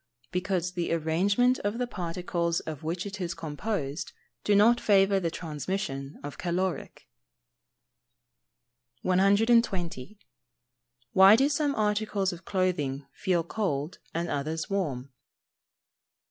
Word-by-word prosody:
_ - - -48
Because 180 -1 -1
the 175 -2 -2
arrangement 195 +10 +2
of 205 +3 -2
the 250 - 0
particles 170 -4 -2
of 155 -3 -7
which 170 +4 -3
it 200 0 -6
is 175 -1 -3
composed 160 -1 -4 0.3
does 205 - +3
not 230 +4 +5
favour 195 -1 +4
the 170 -3 -1
transmission 155 -3 -4
of 145 0 -7
caloric. 180 -1 -3 2.0
120. 195 - +2 1.0
_Why 195 +3 +8
do 270 +3 +4
some 290 -1 0
articles 210 -2 0
of 175 +1 -11
clothing 150 -8 -1
feel 175 -3 0
cold, 165 -5 -2
and 170 +1 -2
others 155 +5 -3
warm? 140 -9 -2
180 Hz, 115 wpm, -28 LUFS, 160-205 Hz, 2.0 s, Why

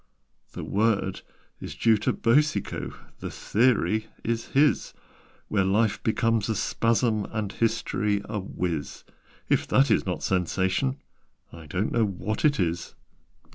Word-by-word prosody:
"The - - -6
word 100 -2 0 0.4
is - - -7
due 115 -1 +4
to 105 - 0
Boucicault 150 +6 +1 0.2
The - - -5
theory 110 -1 +1 0.2
is 115 0 -2
his, 140 -5 +2 0.5
Where 100 -2 +1
Life 100 +3 +1
becomes 115 -1 +1
a 110 - +1
Spasm, 115 0 +1
And 105 -2 -2
History 105 -2 0
a 105 -1 -3
Whiz: 85 -5 -4 0.4
If - - +1
that 135 +2 +4
is - - +3
not 90 -2 -3
Sensation, 95 - 0 0.6
I 80 -2 -11
don't 90 +8 -1
know 115 - +2
what 100 +2 -3
it 150 -2 +3
is. 85 0 -2
110 Hz, 135 wpm, -26 LUFS, 95-115 Hz, 0.6 s, due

